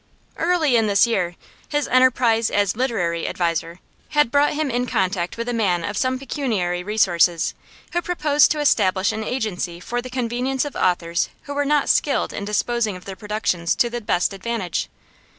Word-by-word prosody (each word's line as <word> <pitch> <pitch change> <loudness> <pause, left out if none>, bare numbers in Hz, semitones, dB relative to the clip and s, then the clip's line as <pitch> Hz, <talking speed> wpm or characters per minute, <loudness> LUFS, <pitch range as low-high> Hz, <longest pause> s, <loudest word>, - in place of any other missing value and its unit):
Early 325 -6 +2
in 225 -1 +2
this 200 +1 +4
year, 185 -7 -1 0.3
his 295 -1 0
enterprise 250 -3 +3
as 200 -1 +1
'literary 190 -10 -1
adviser' 170 0 -2 0.3
had 295 -5 +2
brought 285 +1 +3
him 300 -3 -1
in 245 +1 -1
contact 185 -3 -1
with 230 +1 -4
a 245 - -1
man 185 -7 +1
of 205 +3 -3
some 255 +4 0
pecuniary 225 - -2
resources, 180 -4 +2 0.4
who 345 - +1
proposed 300 -5 +3
to 305 - -1
establish 205 -7 +2
an 220 0 -4
agency 200 -8 -3
for 240 +6 -3
the 255 - -8
convenience 250 +2 -1
of 290 - -6
authors 170 -2 0
who 285 - -6
were 290 0 0
not 295 0 +2
skilled 285 - +1
in 200 - -4
disposing 215 0 0
of 180 - -11
their 195 - -6
productions 210 -5 -1
to 240 - +1
the 240 0 -4
best 195 -2 0
advantage. 195 -3 -3
225 Hz, 175 wpm, -22 LUFS, 185-260 Hz, 0.4 s, this